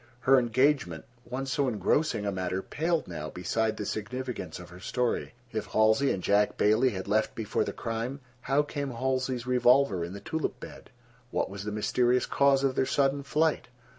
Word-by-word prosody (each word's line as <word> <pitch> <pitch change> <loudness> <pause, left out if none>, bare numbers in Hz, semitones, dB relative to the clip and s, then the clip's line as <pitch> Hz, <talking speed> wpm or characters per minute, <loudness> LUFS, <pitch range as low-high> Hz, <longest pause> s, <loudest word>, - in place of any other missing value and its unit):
Her 135 +2 +6
engagement, 120 - +1 0.2
once 135 +1 -3
so 140 0 +1
engrossing 110 - +1
a 100 - 0
matter, 95 0 -2
paled 165 +1 -1
now 75 -3 -5
beside 110 +6 -1
the 105 - -4
significance 120 -5 -4
of 90 0 -11
her 90 - -11
story. 125 +6 -2 0.2
If 110 -2 -3
Halsey 110 +6 +3
and 90 - -3
Jack 105 +1 +2
Bailey 110 +5 +4
had 95 -5 -5
left 110 +1 +1
before 110 -2 -1
the - - -3
crime, 115 +4 -4 0.2
how 135 +3 +2
came 145 -1 -4
Halsey's 130 0 -1
revolver 125 -6 +3
in 85 +2 -5
the 100 - -7
tulip 130 +3 -3
bed? - - -11 0.4
What - - -1
was 100 0 -7
the 105 - -3
mysterious 120 +4 +2
cause 140 -1 +3
of 135 -1 +2
their 130 - +1
sudden 140 0 +1
flight? 150 +3 0
120 Hz, 180 wpm, -28 LUFS, 105-135 Hz, 0.4 s, Her